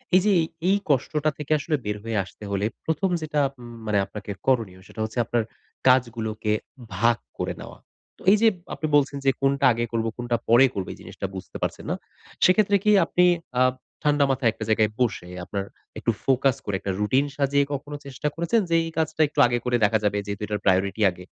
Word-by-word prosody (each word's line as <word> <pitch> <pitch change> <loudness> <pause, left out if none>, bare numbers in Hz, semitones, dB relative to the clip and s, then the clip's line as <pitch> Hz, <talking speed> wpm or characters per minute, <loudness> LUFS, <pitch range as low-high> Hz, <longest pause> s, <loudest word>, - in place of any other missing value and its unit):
এই 185 - +6
যে 210 - +4
এ - - +1 0.3
এই 200 - +4
কষ্টটা 150 +3 +1
থেকে 150 0 -7
আসলে 155 +1 -1
বের 105 0 -2
হয়ে 115 -2 -2
আসতে 95 - -14
হলে, 100 +1 0 0.2
১ম 160 +4 0
যেটা 150 -1 0 0.2
উম 120 -1 -10 0.2
মানে 105 -1 +2
আপনাকে 105 0 -8 0.2
করণীয়। 115 -8 +1
সেটা - - -12
হচ্ছে 110 +3 -3
আপনার 120 0 0 0.4
কাজগুলোকে 115 -4 +2 0.4
ভাগ 115 +3 +3 0.2
করে - - -1
নেওয়া। - - -10 0.4
তো - - -21
এই 215 - +6
যে 230 - +6 0.3
আপনি 155 - -3
বলছেন 140 0 +2
যে, - - +6
"কোনটা 140 +1 +2
আগে 120 +1 -1
করব, 115 -1 0
কোনটা 120 -1 -1
পরে 120 +3 +7
করব।" 95 -2 -3
এই - - -14
জিনিসটা - - -7
বুঝতে 95 - -7
পারছেন - - -3
না। - - +1 0.5
সেক্ষেত্রে 200 +2 +4
কি 210 - +4
আপনি 180 0 +3 0.3
আ - - +4 0.4
ঠান্ডা 145 -1 +3
মাথায় 130 -3 +2
একটা 110 - -6
জায়গায় 110 -1 +3
বসে, 115 -7 0 0.2
আপনার 100 +1 -3 0.3
একটু 115 - +1
ফোকাস 135 -1 +3
করে 100 - -1
একটা 95 - -3
রুটিন 130 +7 +2
সাজিয়ে, 140 0 +2
কখনো 145 +1 -5
চেষ্টা 140 +2 -4
করেছেন? 170 +7 +1
যে, 165 - +3
এই 165 - -5
কাজটা 160 0 0
একটু 150 0 -5
আগে 120 - 0
করে 125 -1 +2
দেখা 110 +2 +3
যাবে 105 0 +1
যেহেতু 100 0 -5
এটার 105 0 -3
প্রায়োরিটি 95 +2 +2
আগে? 90 +1 -12
120 Hz, 200 wpm, -24 LUFS, 105-145 Hz, 0.5 s, পরে